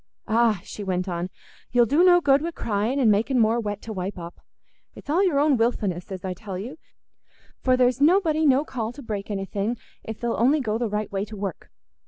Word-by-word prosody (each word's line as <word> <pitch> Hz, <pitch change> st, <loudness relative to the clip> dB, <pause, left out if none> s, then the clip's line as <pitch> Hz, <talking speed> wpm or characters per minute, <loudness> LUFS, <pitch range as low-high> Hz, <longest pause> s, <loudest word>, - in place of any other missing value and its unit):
"Ah," 225 Hz, -4 st, +2 dB
she 205 Hz, -, -8 dB
went 185 Hz, -1 st, -2 dB
on, 175 Hz, 0 st, -3 dB, 0.4 s
"you'll 240 Hz, -1 st, +4 dB
do 290 Hz, +9 st, +3 dB
no 355 Hz, -1 st, +6 dB
good 280 Hz, -2 st, +4 dB
wi' 335 Hz, -, -2 dB
crying 230 Hz, -3 st, -1 dB
an' 235 Hz, -5 st, +4 dB
making 225 Hz, +6 st, +1 dB
more 225 Hz, 0 st, +3 dB
wet 205 Hz, -2 st, -4 dB
to 220 Hz, -, -6 dB
wipe 190 Hz, 0 st, -4 dB
up. 170 Hz, 0 st, -9 dB, 0.5 s
It's -, -, -7 dB
all 355 Hz, +6 st, +3 dB
your 335 Hz, -8 st, +2 dB
own 290 Hz, -2 st, +3 dB
wilfulness, 205 Hz, -6 st, -1 dB
as 190 Hz, -1 st, -6 dB
I 185 Hz, -, -2 dB
tell 195 Hz, 0 st, -7 dB
you, 250 Hz, -, -7 dB, 0.8 s
for 255 Hz, -1 st, +3 dB
there's 250 Hz, +1 st, +2 dB
nobody 320 Hz, -1 st, +3 dB
no 280 Hz, 0 st, +4 dB
call 230 Hz, -5 st, -4 dB
to 280 Hz, -, -11 dB
break 205 Hz, -3 st, -5 dB
anything 200 Hz, +3 st, -2 dB, 0.3 s
if 220 Hz, -1 st, -7 dB
they'll 235 Hz, -1 st, -1 dB
only 270 Hz, +6 st, +4 dB
go 220 Hz, -4 st, -1 dB
the 235 Hz, -2 st, -1 dB
right 210 Hz, 0 st, -3 dB
way 195 Hz, 0 st, -1 dB
to 215 Hz, 0 st, -10 dB
work. 195 Hz, -4 st, -5 dB
225 Hz, 215 wpm, -24 LUFS, 200-270 Hz, 0.8 s, no